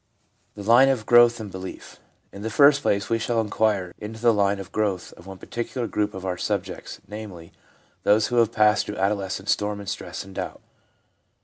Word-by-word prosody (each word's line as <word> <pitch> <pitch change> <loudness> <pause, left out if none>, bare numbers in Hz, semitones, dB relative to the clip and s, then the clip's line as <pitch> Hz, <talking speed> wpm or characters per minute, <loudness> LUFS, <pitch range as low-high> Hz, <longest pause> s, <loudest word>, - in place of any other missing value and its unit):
The 105 - -8
Line 120 +5 +6
of 125 -5 0
Growth 120 0 +6
in 110 -2 -6
Belief. 95 0 -9 0.3
In 100 - -10
the 110 - -3
first 140 +4 +5
place, 100 -6 0
we 115 - 0
shall 115 +1 0
inquire 105 -4 0
into 110 +1 -7
the 120 0 +4
line 100 -1 +2
of 95 -1 -9
growth 100 -4 -2
of 85 - -16
one 95 -1 -9
particular 120 +4 -4
group 105 -2 -2
of 95 0 -7
our 90 -1 -2
subjects, - - -4
namely, 100 -6 -9 0.5
those 105 +1 +3
who 120 - -1
have 115 -2 +4
passed 105 0 +3
through 105 - -5
adolescent 95 0 -1
storm 105 0 0
and 100 - -9
stress 90 -4 -5
and 95 0 -13
doubt. - - -6
105 Hz, 195 wpm, -24 LUFS, 95-115 Hz, 0.5 s, Line